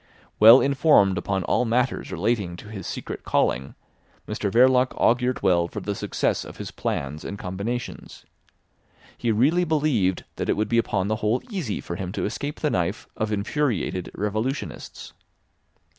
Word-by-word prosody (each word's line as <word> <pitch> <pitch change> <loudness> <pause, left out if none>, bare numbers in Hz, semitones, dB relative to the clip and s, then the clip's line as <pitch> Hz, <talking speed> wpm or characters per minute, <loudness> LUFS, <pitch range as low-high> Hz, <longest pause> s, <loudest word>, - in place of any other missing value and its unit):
Well 115 +4 +9
informed 135 - +4
upon 95 -2 -2
all - - +1
matters 125 +2 0
relating 100 -7 -1
to 105 - -11
his 100 -5 -7
secret - - -6
calling, 65 +1 0 0.5
Mr 100 - -2
Verloc 125 +2 +4
augured 125 +1 +2
well 85 -2 +3
for - - -6
the 100 - -3
success - - -1
of - - -11
his - - -6
plans 70 +2 -3
and 100 - -5
combinations. 100 +7 -5 0.9
He 120 - -1
really 145 +11 +3
believed 145 - +1
that - - -3
it - - +2
would 105 0 0
be 115 - +3
upon 100 -4 0
the 110 +1 0
whole 110 +3 0
easy 170 - -3
for 85 - -6
him 90 -1 -4
to - - -2
escape 145 +7 -4
the 150 - +1
knife 90 -2 -1
of 110 0 -2
infuriated 105 - -1
revolutionists. 110 +7 -4
110 Hz, 160 wpm, -24 LUFS, 95-125 Hz, 0.9 s, Well